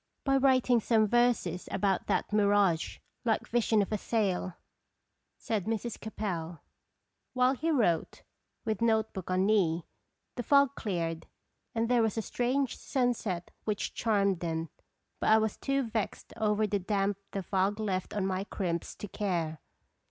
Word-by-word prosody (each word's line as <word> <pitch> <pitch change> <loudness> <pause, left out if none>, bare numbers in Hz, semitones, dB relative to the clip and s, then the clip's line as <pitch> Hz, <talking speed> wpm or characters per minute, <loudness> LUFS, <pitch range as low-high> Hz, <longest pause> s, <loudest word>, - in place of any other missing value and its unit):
" - - -50
By 275 -1 +4
writing 255 -2 +4
some 220 0 +3
verses 240 -7 +1
about 195 -2 0
that - - 0
mirage 200 -5 +3 0.3
like 225 -3 0
vision 225 -3 +2
of 195 - -7
a 215 - 0
sail," 190 -6 -1 0.8
said 210 -5 -2
Mrs. 225 +1 -3
Capel. 175 -7 -4 0.7
While 255 0 +3
he 315 +5 -2
wrote, 215 - +1 0.4
with 220 -2 -1
note 220 -1 +2
book 190 -2 -6
on 185 +1 +2
knee, 180 -6 +2 0.5
the - - 0
fog 280 +2 +4
cleared, 165 -8 -3 0.5
and 225 0 +1
there 245 -1 +3
was 225 -1 0
a 225 - 0
strange 255 +4 0
sun 245 -2 +1
set 185 -6 -4
which 210 -2 -2
charmed 200 -5 +1
them, 165 -1 -2 0.5
but - - +1
I 220 - +7
was 220 -1 0
too 275 0 0
vexed 225 -3 -4
over 215 0 +1
the 205 -1 0
damp 195 +1 0
the 195 - -4
fog 195 +3 0
left 190 -3 -2
on 200 -2 0
my 190 0 -1
crimps 170 -5 -3
to 210 - -7
care. 170 -7 -2
210 Hz, 160 wpm, -30 LUFS, 185-230 Hz, 0.8 s, I